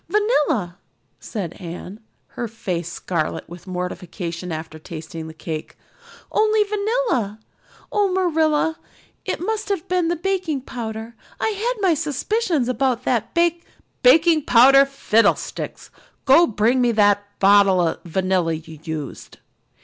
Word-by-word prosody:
"Vanilla," 300 - +1 0.4
said 190 -7 -5
Anne, 180 +4 -8 0.3
her 240 - -4
face 180 -6 -4
scarlet 170 -3 -3
with 175 +2 -12
mortification 180 -1 -5
after 160 0 -6
tasting 160 0 -8
the - - -8
cake. 160 -1 -6 0.5
"Only 430 0 +3
vanilla. 415 - -1 0.5
Oh, 410 -2 +2
Marilla, 320 -3 +1 0.5
it - - -2
must 435 +3 -3
have 390 -5 -2
been 360 -2 +1
the 345 - +1
baking 355 -5 -1
powder. 225 -2 -6 0.3
I - - +1
had 445 +4 -1
my 345 - +5
suspicions 310 - -1
of 255 - -2
that 250 -3 0
bak 340 -1 +4 0.3
" - - -45
"Baking 310 +4 +5
powder 270 +3 +7
fiddlesticks! 230 -5 0 0.3
Go 320 +6 +7
and 225 - -8
bring 235 +5 +3
me 240 -1 +3
the 205 -2 +4 0.2
bottle 200 -1 +5
of - - -3
vanilla 185 -1 0
you 160 -1 -8
used." 155 -4 -6
240 Hz, 135 wpm, -22 LUFS, -, 0.5 s, powder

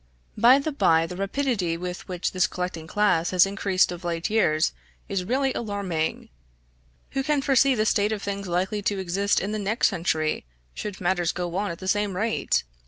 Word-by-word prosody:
By 240 +5 +6
the 280 +3 -2
bye, 165 - +3
the 180 - -7
rapidity 195 -3 -1
with 180 +1 -6
which 180 -1 -2
this 185 -1 +2
collecting 180 -3 -5
class 180 -3 +2
has 185 0 +5
increased 195 -2 +1
of 175 0 -7
late 170 +2 -2
years 155 -7 +2 0.4
is 195 -2 -2
really 265 +4 +1
alarming; 200 -8 -3 0.8
who 270 - -1
can 295 +1 +1
foresee 270 -1 +4
the 215 -2 +1
state 210 -1 +2
of 210 -2 -3
things 200 -1 -4
likely 185 +4 -1
to 200 0 -1
exist 190 +2 +1
in 200 - -3
the 215 - -2
next 210 +3 +2
century, 165 -4 -1 0.3
should 205 -3 -6
matters 175 -1 +1
go 175 -1 -4
on 200 +1 -1
at 170 - -5
the 185 - -8
same 205 -1 0
rate? 215 - 0
195 Hz, 185 wpm, -25 LUFS, 175-215 Hz, 0.8 s, By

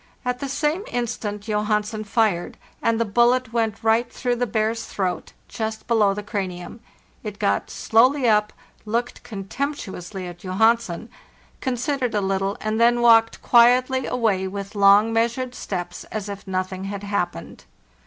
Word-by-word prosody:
At 250 0 -1
the 280 - -4
same 300 +7 0
instant 220 -4 -3
Johansen 210 0 -1
fired, 205 -5 0 0.2
and 230 0 +1
the 230 - +2
bullet 240 +2 +2
went 225 -2 -1
right 225 +2 +2
through 245 -1 -1
the 245 +1 0
bear's 220 +1 -1
throat, 185 -3 -3
just 220 -1 -4
below 215 -4 +3
the 210 - -5
cranium. 190 -1 -5 0.2
— - - -35
It 210 -2 -6
got 100 - 0
slowly 250 +4 +3
up, 210 -1 +3 0.3
looked 235 +3 -2
contemptuously 195 -4 -5
at 175 -1 -9
Johansen, 210 0 +1 0.5
considered 260 -1 -1
a - - +3
little, 195 +1 -1
and 215 +1 -1
then 240 +1 +4
walked 225 -1 +5
quietly 250 +2 +4
away 215 -6 0
with 200 +1 -6
long, 205 +2 +5
measured 235 +3 0
steps, 175 -6 -5
as 215 -2 -5
if 200 0 -8
nothing 185 0 -3
had 200 0 -5
happened. 175 - -4
220 Hz, 150 wpm, -23 LUFS, 200-240 Hz, 0.5 s, walked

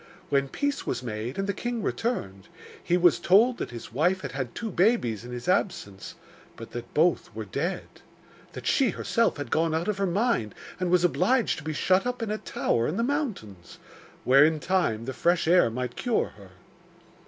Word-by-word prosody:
When 140 -1 +2
peace 285 - -2
was - - -2
made, 115 +1 -5
and 195 - -1
the 200 - 0
king 240 +2 -3
returned, 100 - -3 0.4
he 175 - +2
was 175 -2 +4
told 225 +7 +4
that - - -3
his 115 -1 -9
wife 175 +8 +1
had - - -5
had 130 -3 -5
two 225 -2 -4
babies 175 - +1
in 120 - -9
his 120 0 -7
absence, 100 - -1 0.4
but 115 - -10
that 120 0 -7
both 165 +3 +2
were 110 -1 -5
dead; 165 - -3 0.7
that - - -8
she 270 -4 +3
herself 230 -2 0
had 145 - -6
gone 160 0 +1
out 165 +2 -1
of 210 -2 -1
her 195 - +1
mind 175 - 0 0.2
and 180 -1 -1
was 180 0 +3
obliged 200 +7 +2
to - - -11
be 155 - -3
shut 185 +8 +2
up 250 -1 -3
in 215 - -3
a 215 - -2
tower 115 0 -1
in 170 - -2
the 230 - +1
mountains, 220 - -4 0.5
where, 135 +3 +6
in 155 0 +3
time, 145 -12 0
the 130 - -4
fresh 170 +4 +1
air 175 -7 +5
might 125 +1 -4
cure 245 -3 0
her. 100 -2 -16
170 Hz, 200 wpm, -26 LUFS, -, 0.7 s, where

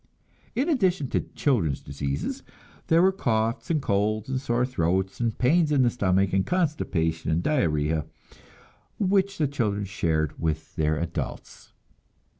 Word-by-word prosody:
In 265 +6 +1
addition 190 - +1
to - - +1 0.2
children's 100 - +1
diseases, 70 0 -4 0.5
there 165 +2 +5
were 190 - +5
coughs 115 - -1
and 160 -2 +2
colds 105 +2 0
and 130 -1 -1
sore 125 -2 +1
throats 95 -5 -1
and 115 -2 -1
pains 155 +5 +3
in 140 -3 +4
the 120 - +3
stomach 95 -4 +1
and 95 0 +3
constipation 100 - -1
and 80 +2 +1
diarrhea, 80 - +1 0.9
which 195 0 +1
the 150 - +2
children 105 -7 -1
shared 80 -5 -1
with 80 -1 -2
their 75 0 +1
adults. 85 +1 -5
110 Hz, 140 wpm, -26 LUFS, -, 0.9 s, there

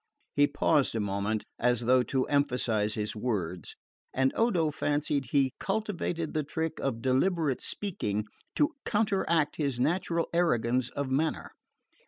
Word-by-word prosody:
He 145 0 +5
paused 145 -6 +2
a - - 0
moment, 100 +1 -1 0.2
as 120 -1 +2
though 125 +2 +4
to 130 +1 0
emphasise 120 -7 +1
his 105 0 -3
words; 95 - -3 0.4
and 135 0 +1
Odo 180 -10 +2
fancied 145 -1 0
he 135 -2 +2
cultivated 195 -6 -2
the 155 - +1
trick 160 +2 -3
of 120 -4 -2
deliberate 140 +2 +1
speaking 105 - -2 0.3
to 300 +2 +2
counteract 195 -8 +1
his 140 -5 -1
natural 170 +3 +1
arrogance 125 -7 +2
of 140 -2 -4
manner. 155 +4 0
140 Hz, 135 wpm, -29 LUFS, 120-165 Hz, 0.4 s, He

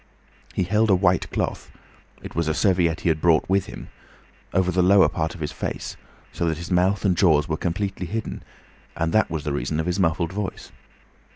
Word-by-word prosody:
He 95 - +1
held 105 +4 +2
a 95 - +6
white 90 -1 +2
cloth—it - - -7
was 85 -1 -1
a 80 - 0
serviette 90 -5 +2
he - - +1
had 80 -1 0
brought 80 -3 +3
with 95 0 +1
him—over 90 -1 -5
the 90 +1 +2
lower 95 +2 +6
part 80 0 -3
of 85 - -11
his 75 - -3
face, - - -5 0.4
so 85 - -1
that 80 -2 -1
his 85 +3 -7
mouth 95 +3 +2
and 95 -2 +3
jaws 80 -5 +3
were 80 - -1
completely 95 +2 -3
hidden, 110 +3 -4 0.6
and 80 0 -1
that 110 - +3
was 80 -3 -3
the 75 - -2
reason 75 +2 -2
of 80 - -1
his 90 +2 -1
muffled 85 -1 +1
voice. 100 -1 -5
90 Hz, 195 wpm, -23 LUFS, 80-95 Hz, 0.6 s, a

